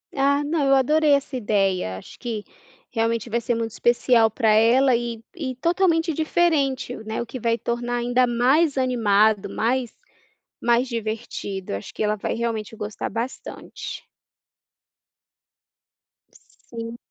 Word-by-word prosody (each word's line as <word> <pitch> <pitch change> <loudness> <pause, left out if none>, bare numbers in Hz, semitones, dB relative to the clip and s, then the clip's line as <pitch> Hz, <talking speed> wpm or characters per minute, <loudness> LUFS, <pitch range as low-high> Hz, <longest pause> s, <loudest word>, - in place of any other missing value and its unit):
Ah, 280 +1 +2
não, 300 0 0
eu 275 0 +5
adorei 300 +3 +3
essa 280 -1 +1
ideia. 195 - 0
Acho - - -12
que 225 -4 -4 0.5
realmente 230 0 -1
vai 235 - 0
ser 235 +1 -1
muito 230 -1 -2
especial 240 0 +3
para 220 0 +1
ela 235 +4 +5
e 235 -1 -4
e 260 -7 -4
totalmente 335 +2 +1
diferente 300 -5 +1
o 220 - -10
né. 220 +1 -3
O - - -4
que 255 +2 -7
vai 230 0 +1
tornar 240 +1 -2
ainda 245 +1 +2
mais 265 +6 +2
animado, 220 -5 +2
mais 245 +1 -1 0.7
mais 240 +2 +2
divertido. 220 - -4
Acho 100 - -8
que - - -3
ela 210 0 +1
vai 205 - -3
realmente 225 -2 -3
gostar 210 -1 -5
bastante. 230 +5 -6 2.6
Sim. 230 0 -6
240 Hz, 135 wpm, -23 LUFS, 225-265 Hz, 2.6 s, eu